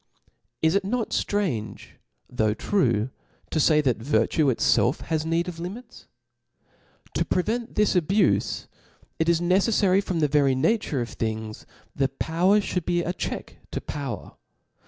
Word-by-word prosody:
Is 160 Hz, +1 st, +4 dB
it 200 Hz, 0 st, +2 dB
not 225 Hz, +3 st, -2 dB
ftrange, 180 Hz, -, -2 dB, 0.4 s
though 110 Hz, -4 st, 0 dB
true, 120 Hz, -, +1 dB, 0.4 s
to 160 Hz, -, 0 dB
fay, 150 Hz, 0 st, +4 dB
that 130 Hz, -5 st, +1 dB
virtue 145 Hz, +5 st, +1 dB
itfelf 130 Hz, +2 st, +2 dB
has 160 Hz, -1 st, -2 dB
need 165 Hz, +2 st, 0 dB
of 170 Hz, -2 st, -6 dB
limits? 195 Hz, +9 st, -8 dB, 1.1 s
To -, -, +1 dB
prevent 225 Hz, +6 st, -1 dB
this 210 Hz, -1 st, +3 dB
abufe, 185 Hz, +4 st, +1 dB, 0.5 s
it 160 Hz, +1 st, +2 dB
is 170 Hz, -1 st, +3 dB
necefTary 195 Hz, +2 st, +3 dB
from 180 Hz, -4 st, -2 dB
the 150 Hz, -, +3 dB
very 140 Hz, -2 st, +3 dB
nature 150 Hz, -, +1 dB
of 120 Hz, -, -5 dB
thingj, 110 Hz, -1 st, -4 dB, 0.5 s
power 180 Hz, +6 st, +3 dB
(hould 180 Hz, -3 st, -2 dB
be 175 Hz, 0 st, 0 dB
a 175 Hz, -, -2 dB
check -, -, -5 dB
to -, -, -3 dB
power. 140 Hz, -7 st, -6 dB
165 Hz, 140 wpm, -25 LUFS, 135-195 Hz, 1.1 s, Is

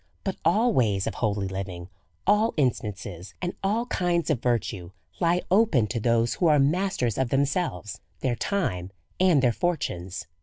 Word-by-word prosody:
But 195 Hz, -, -3 dB
all 215 Hz, +9 st, +3 dB
ways 105 Hz, -, +2 dB
of -, -, -2 dB
holy 105 Hz, -3 st, -1 dB
living, 95 Hz, -2 st, -5 dB, 0.4 s
all 210 Hz, +3 st, +3 dB
instances, 105 Hz, -, -2 dB
and 180 Hz, 0 st, -3 dB
all 215 Hz, +5 st, 0 dB
kinds 175 Hz, -7 st, 0 dB
of 130 Hz, -6 st, 0 dB
virtue, 110 Hz, -7 st, -1 dB, 0.3 s
lie 175 Hz, 0 st, +2 dB
open 190 Hz, -, +4 dB
to 115 Hz, -, -2 dB
those 115 Hz, +1 st, +2 dB
who 175 Hz, -, +1 dB
are 150 Hz, -1 st, +5 dB
masters 145 Hz, -, +1 dB
of 130 Hz, -2 st, +1 dB
themselves, 135 Hz, -, -1 dB, 0.2 s
their 125 Hz, -3 st, 0 dB
time, 115 Hz, -, -2 dB, 0.3 s
and 180 Hz, -7 st, +4 dB
their 125 Hz, -, +4 dB
fortunes. 100 Hz, -, -2 dB
130 Hz, 155 wpm, -26 LUFS, -, 0.4 s, are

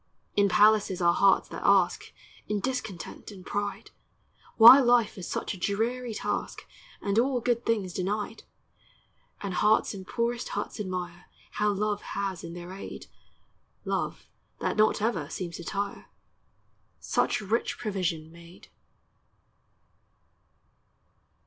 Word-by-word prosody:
In 200 Hz, -1 st, +4 dB
palaces 210 Hz, -2 st, +4 dB
are 170 Hz, -1 st, +4 dB
hearts 195 Hz, +1 st, +4 dB
that -, -, -7 dB
ask, 190 Hz, -3 st, +3 dB, 0.4 s
In 210 Hz, 0 st, -1 dB
discontent 220 Hz, -6 st, -5 dB
and 190 Hz, -3 st, -12 dB
pride, 205 Hz, 0 st, -4 dB, 0.7 s
Why 235 Hz, +4 st, +11 dB
life 240 Hz, -4 st, +3 dB
is 185 Hz, -3 st, -7 dB
such -, -, -3 dB
a -, -, -8 dB
dreary 225 Hz, +5 st, -1 dB
task, -, -, -3 dB, 0.4 s
And 200 Hz, +1 st, +2 dB
all 255 Hz, +1 st, +2 dB
good 240 Hz, 0 st, -1 dB
things 205 Hz, -6 st, 0 dB
denied; 205 Hz, +4 st, -3 dB, 1.0 s
And 200 Hz, -2 st, -4 dB
hearts 210 Hz, +4 st, +3 dB
in 190 Hz, -2 st, -8 dB
poorest 235 Hz, +2 st, -2 dB
huts -, -, -4 dB
admire 180 Hz, -3 st, -5 dB, 0.2 s
How 210 Hz, 0 st, 0 dB
Love 205 Hz, 0 st, -1 dB, 0.2 s
has 195 Hz, -2 st, -3 dB
in 170 Hz, 0 st, -7 dB
their 175 Hz, +1 st, -8 dB
aid 195 Hz, -, -8 dB, 0.8 s
(Love -, -, -3 dB, 0.3 s
that -, -, -1 dB
not 215 Hz, -1 st, +3 dB
ever 180 Hz, -11 st, -1 dB
seems 170 Hz, -3 st, -5 dB
to -, -, -8 dB
tire) 200 Hz, +3 st, -4 dB, 0.9 s
Such -, -, 0 dB
rich 215 Hz, +3 st, -1 dB
provision 175 Hz, -7 st, -3 dB
made. 170 Hz, +1 st, -15 dB
200 Hz, 125 wpm, -28 LUFS, 185-220 Hz, 1.0 s, Why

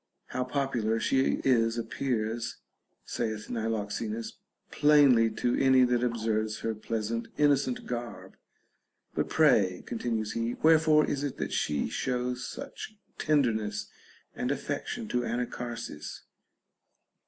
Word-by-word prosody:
How 130 Hz, -, -1 dB
popular 125 Hz, -4 st, 0 dB
she 135 Hz, +3 st, +2 dB
is 115 Hz, -3 st, +3 dB
appears, 115 Hz, -1 st, -2 dB, 0.5 s
saith 110 Hz, -2 st, -3 dB
Niloxenus, 110 Hz, 0 st, -3 dB, 0.4 s
plain 145 Hz, -3 st, +6 dB
ly 115 Hz, 0 st, +4 dB
to 120 Hz, -, +1 dB
any 130 Hz, -1 st, +5 dB
that 125 Hz, -1 st, +2 dB
observes 110 Hz, -2 st, -1 dB
her 115 Hz, -, -1 dB
pleasant 115 Hz, +1 st, -3 dB
innocent 140 Hz, -4 st, +2 dB
garb. 120 Hz, -1 st, -6 dB, 0.8 s
But -, -, -1 dB
pray, 100 Hz, -, +3 dB
continues 115 Hz, -2 st, -2 dB
he, 115 Hz, +2 st, -2 dB
wherefore 155 Hz, -1 st, +6 dB
is 140 Hz, 0 st, -2 dB
it 145 Hz, -, -3 dB
that -, -, -3 dB
she 75 Hz, -1 st, 0 dB
shows 125 Hz, -1 st, -2 dB
such 215 Hz, -, -8 dB, 0.2 s
tenderness 110 Hz, -9 st, +1 dB, 0.4 s
and -, -, -2 dB
affection 110 Hz, -, -3 dB
to 125 Hz, -, +1 dB
Anacharsis? 120 Hz, 0 st, -4 dB
120 Hz, 115 wpm, -29 LUFS, 110-130 Hz, 0.8 s, plain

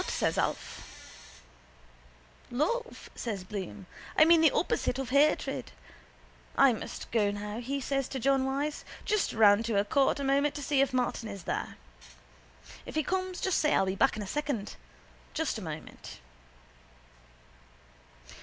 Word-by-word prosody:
—What? -, -, -5 dB
says -, -, 0 dB
Alf. -, -, -2 dB, 1.7 s
—Love, 460 Hz, -, -2 dB
says 205 Hz, -6 st, -4 dB
Bloom. 195 Hz, 0 st, -6 dB, 0.3 s
I 310 Hz, -, +8 dB
mean 335 Hz, 0 st, +6 dB
the 320 Hz, -, +7 dB
opposite 245 Hz, -, 0 dB
of 265 Hz, -2 st, -4 dB
hatred. 290 Hz, +3 st, +2 dB, 0.9 s
I 275 Hz, -2 st, +6 dB
must 220 Hz, -, -7 dB
go 215 Hz, -3 st, +2 dB
now, 210 Hz, +2 st, -4 dB
says 275 Hz, +1 st, -2 dB
he -, -, -21 dB
to 265 Hz, -, -2 dB
John 270 Hz, +2 st, +2 dB
Wyse. 280 Hz, +3 st, -2 dB, 0.2 s
Just 425 Hz, -2 st, +1 dB
round 210 Hz, -1 st, +5 dB
to 230 Hz, -, -1 dB
the 200 Hz, 0 st, +2 dB
court 275 Hz, +6 st, +2 dB
a -, -, -2 dB
moment 280 Hz, +2 st, +2 dB
to 290 Hz, -, -5 dB
see 275 Hz, 0 st, +2 dB
if 275 Hz, -1 st, +2 dB
Martin 245 Hz, -3 st, -1 dB
is 200 Hz, -3 st, -7 dB
there. -, -, -3 dB, 1.1 s
If -, -, -9 dB
he 310 Hz, -, +2 dB
comes 370 Hz, +2 st, -2 dB
just 380 Hz, -, +1 dB
say 300 Hz, -, +3 dB
I'll 195 Hz, -, +3 dB
be 190 Hz, -, -1 dB
back 270 Hz, +3 st, +2 dB
in 210 Hz, -, -3 dB
a -, -, -6 dB
second. 275 Hz, -2 st, -3 dB, 0.6 s
Just -, -, -1 dB
a -, -, -8 dB
moment. -, -, -8 dB
270 Hz, 155 wpm, -30 LUFS, 215-295 Hz, 1.7 s, I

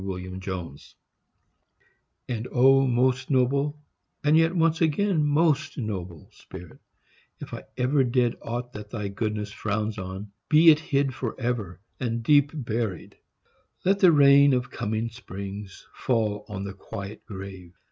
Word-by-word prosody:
SACRIFICE 95 Hz, -4 st, -6 dB, 1.3 s
And 120 Hz, -1 st, -3 dB
O 135 Hz, +2 st, +5 dB
most 130 Hz, +1 st, +1 dB
noble, 140 Hz, +2 st, +1 dB, 0.5 s
and 150 Hz, +1 st, +4 dB
yet 165 Hz, +2 st, +3 dB
once 165 Hz, -1 st, +2 dB
again 165 Hz, +1 st, +2 dB
Most 150 Hz, 0 st, +1 dB
noble 95 Hz, -, -5 dB
spirit, 90 Hz, -, -12 dB, 0.6 s
if -, -, -9 dB
I -, -, -5 dB, 0.2 s
ever 130 Hz, +2 st, +2 dB
did 120 Hz, -1 st, +1 dB
Aught 120 Hz, +1 st, -5 dB
that 105 Hz, 0 st, -8 dB
thy 105 Hz, -3 st, -4 dB
goodness 105 Hz, 0 st, -3 dB
frowns 105 Hz, 0 st, -3 dB
on, 95 Hz, +2 st, -7 dB, 0.2 s
be 160 Hz, +2 st, +8 dB
it 150 Hz, -, +3 dB
hid 140 Hz, -3 st, 0 dB
Forever, 115 Hz, -7 st, -3 dB, 0.2 s
and 115 Hz, -2 st, -2 dB
deep 145 Hz, +2 st, +5 dB
buried. 115 Hz, -, -4 dB, 0.7 s
Let 195 Hz, +2 st, +3 dB
the 185 Hz, -3 st, +7 dB
rain 140 Hz, -1 st, +6 dB
Of 125 Hz, -1 st, -1 dB
coming 110 Hz, 0 st, -2 dB
springs 100 Hz, -4 st, -8 dB
fall 105 Hz, -4 st, -1 dB
on 100 Hz, -2 st, -5 dB
the 100 Hz, 0 st, -5 dB
quiet 100 Hz, +1 st, -8 dB
grave. 95 Hz, -3 st, -9 dB
120 Hz, 135 wpm, -26 LUFS, 100-140 Hz, 1.3 s, be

